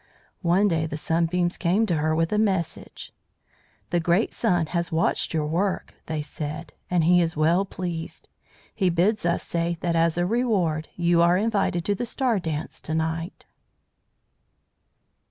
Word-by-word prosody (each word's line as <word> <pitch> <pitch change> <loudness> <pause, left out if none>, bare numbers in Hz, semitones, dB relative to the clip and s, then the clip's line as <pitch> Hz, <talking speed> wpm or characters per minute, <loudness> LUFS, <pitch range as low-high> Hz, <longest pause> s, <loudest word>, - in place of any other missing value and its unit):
One 185 +3 +3
day 160 -4 0
the 155 - -5
Sunbeams 170 +3 0
came 190 +5 +2
to 175 -6 0
her 155 +1 +1
with 165 +4 0
a 210 - +2
message. 190 -6 -2 0.8
"The 175 - +2
great 170 +6 +1
Sun 175 -8 +1
has 170 -1 -1
watched 160 +1 0
your 155 -2 0
work," 180 +5 -1
they 155 -2 -2
said, 150 +1 -6 0.2
"and 175 -2 +2
he 175 +2 +5
is 165 -2 -1
well 170 +5 +3
pleased. 175 -4 -5 0.5
He 190 -4 +1
bids 180 +3 +1
us 170 - 0
say 170 0 -1
that 170 -1 0
as 165 0 +2
a 175 - +2
reward 185 -8 0
you 170 -1 +3
are 170 +1 +4
invited 195 -5 0
to 205 - +2
the 235 +5 -3
star 245 -3 +1
dance 160 -3 -4
to 160 - -3
night." 160 +3 -3
170 Hz, 160 wpm, -25 LUFS, 160-185 Hz, 0.8 s, he